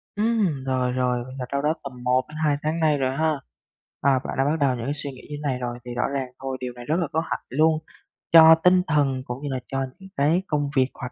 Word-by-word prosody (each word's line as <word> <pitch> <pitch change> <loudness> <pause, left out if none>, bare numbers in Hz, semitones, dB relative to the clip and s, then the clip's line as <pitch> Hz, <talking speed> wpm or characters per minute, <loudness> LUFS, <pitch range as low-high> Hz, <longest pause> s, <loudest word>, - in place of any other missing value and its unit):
Ừm, 210 - +1
rồi, 130 -1 0
rồi, 125 -1 0 0.2
là 125 - -3
đâu 140 0 0
đó 150 +2 +2
tầm 140 - -6
1 125 +1 +3
đến 155 - -9
2 145 -1 +2
tháng 155 +2 -1
nay 155 -2 +3
rồi 130 -1 0
ha. 160 +1 +2 0.7
Ờ, 135 -2 +3
bạn - - -5
đã 135 - +2
bắt 150 +2 +1
đầu 135 -3 +2
những 120 +3 -3
suy 145 -1 -4
nghĩ 130 - -12
như 145 - -5
này 140 -4 -1
rồi 120 -1 -4
thì 120 - -6
rõ 125 - 0
ràng 135 -2 -2
thôi, 135 -1 -3
điều 125 -1 -4
này 120 0 -10
rất 155 - 0
là 170 - 0
có 160 - +1
hại - - -2
luôn, 155 +3 +3 0.5
cho 160 0 +10
tinh 180 0 +6
thần 140 -4 +1
cũng 125 +4 -6
như 145 - -3
là 130 -1 -2
cho 135 0 -2
những 190 0 -12
cái 155 +6 +3
công 145 -2 0
việc, 130 -1 +4
hoạt 125 +1 -7
140 Hz, 260 wpm, -24 LUFS, 130-155 Hz, 0.7 s, cho